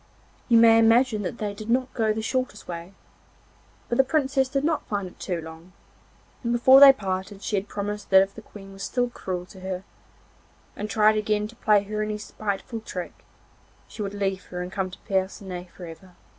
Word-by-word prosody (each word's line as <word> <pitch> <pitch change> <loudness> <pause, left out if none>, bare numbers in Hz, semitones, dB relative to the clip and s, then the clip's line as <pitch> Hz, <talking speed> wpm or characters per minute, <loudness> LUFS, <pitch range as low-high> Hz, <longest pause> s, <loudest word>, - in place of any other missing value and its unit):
You 235 - +6
may 225 0 +7
imagine 225 0 +4
that 205 +4 -4
they 210 -2 -3
did 215 +2 -9
not 255 +2 +1
go 220 -3 +1
the 220 +1 -3
shortest 255 -2 -3
way, 170 +2 -7 0.9
but 235 - -2
the - - +8
Princess 270 -2 +1
did 275 +1 -1
not 315 0 0
find 200 -3 -2
it 180 - -15
too 180 -3 -3
long, 160 +2 -11 0.7
and 235 - -1
before 260 +3 +7
they 280 -1 +11
parted 195 -4 -4
she - - -1
had 200 +1 -2
promised 205 +1 -5
that 190 0 +7
if 195 0 -7
the - - -10
Queen 195 -1 -13
was 195 - -11
still 245 +2 -1
cruel 180 -5 -5
to 190 +1 -14
her, 185 0 -5 0.9
and 210 +1 -5
tried 215 0 +4
again 210 0 0
to 230 - -14
play 210 -3 +3
her 215 +1 -4
any 215 0 -2
spiteful 210 +2 -4
trick, 180 -5 -6 0.7
she - - -9
would 200 0 -4
leave 195 -1 -2
her 180 0 -5
and 180 - -7
come 190 -1 -2
to 185 - -11
Percinet 190 -2 -3
for 180 - -11
ever. 170 +2 -12
210 Hz, 200 wpm, -25 LUFS, 190-230 Hz, 0.9 s, they